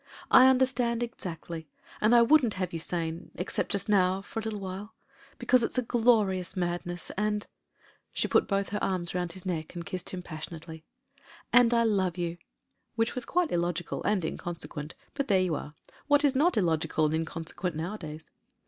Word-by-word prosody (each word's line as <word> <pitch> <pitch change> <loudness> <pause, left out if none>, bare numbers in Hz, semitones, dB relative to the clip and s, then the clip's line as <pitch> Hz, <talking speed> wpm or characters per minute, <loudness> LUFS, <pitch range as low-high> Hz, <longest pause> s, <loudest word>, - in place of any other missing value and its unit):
"I 255 - +9
understand 250 -2 +2
exactly. 165 -7 -6 0.3
And 220 +3 +5
I 235 - +8
wouldn't 250 -3 +4
have 185 -2 -3
you 165 - -2
sane, 165 0 -3
except 180 - -2
just 200 - +1
now 190 -2 +3
for 225 - -5
a - - -2
little 215 -1 -4
while. 195 +3 -7 0.4
Because 255 -2 +3
it's - - -1
a 255 - +2
glorious 215 -6 +2
madness, 175 0 -2
and" 210 0 0 0.3
— - - -32
she - - 0
put - - +3
both 195 -1 0
her 205 - -3
arms 180 -2 0
round 180 -1 -2
his 185 -1 -9
neck 165 -2 -3
and 170 -1 -5
kissed 185 -1 -4
him 180 -1 -5
passionately 160 0 -7 0.4
— 275 - -24
^'and 240 -1 +7
I 235 -1 +4
love 190 -5 +1
you." 175 -1 -3 0.6
Which 225 0 +1
was 250 - -3
quite 355 -2 +1
illogical 175 0 -1
and 205 -5 +1
inconsequent 165 -2 -6
— - - -36
^but 280 -1 -1
there 195 -2 +4
you 180 -3 0
are. 150 0 -5 0.3
What 290 0 +4
is 280 - +4
not 310 +4 +3
illogical 160 -4 +1
and 150 - +1
inconsequent 165 +2 -3
nowadays? 160 -2 -6
185 Hz, 185 wpm, -29 LUFS, 170-230 Hz, 0.6 s, I